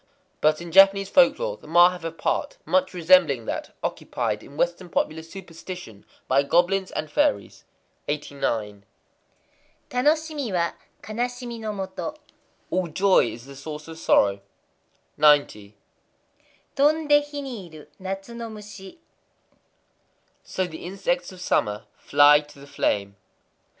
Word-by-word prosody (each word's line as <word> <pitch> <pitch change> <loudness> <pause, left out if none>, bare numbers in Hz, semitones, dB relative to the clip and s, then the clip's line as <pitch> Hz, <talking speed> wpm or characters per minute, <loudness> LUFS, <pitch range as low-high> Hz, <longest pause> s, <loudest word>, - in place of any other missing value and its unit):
But 155 +1 +3
in 170 -1 -8
Japanese 195 +2 +6
folklore 390 - +3
the - - -17
Ma 175 +2 +6
have 180 -2 -9
a 165 - -3
part 165 - -2
much 185 +3 +1
resembling 170 -8 +4
that - - -5
occupied 110 -4 -2
in 140 - -14
Western 175 +2 -1
popular 160 -1 -1
superstition 165 - -10 0.2
by 135 +1 +4
goblins 180 +6 +2
and 155 - -4
fairies. 295 -1 0 0.4
89.—Tanoshimi 150 - -4
wa 170 -1 +1 0.3
hanasimi 240 +1 -4
no 220 -1 -4
motoi. 195 +9 -5 0.5
All 185 -1 0
joy 190 +2 +3
is 115 +1 -10
the 140 0 -12
source 150 +2 -8
of 160 0 -9
sorrow. 100 -9 +3 0.8
90.—Tondé 155 - 0
hi 290 -1 -4
ni 235 -10 -7
iru 155 -2 -13
natsu 195 +4 -6
no 235 -1 -6
mushi. 210 - -11 1.5
So 185 - -2
the 160 -3 -9
insects 255 +9 -2
of 185 - -13
summer 105 -12 0
fly 145 +1 +6
to 150 -1 -14
the 140 - -12
flame. 100 -7 -1
180 Hz, 125 wpm, -24 LUFS, 150-215 Hz, 1.5 s, Japanese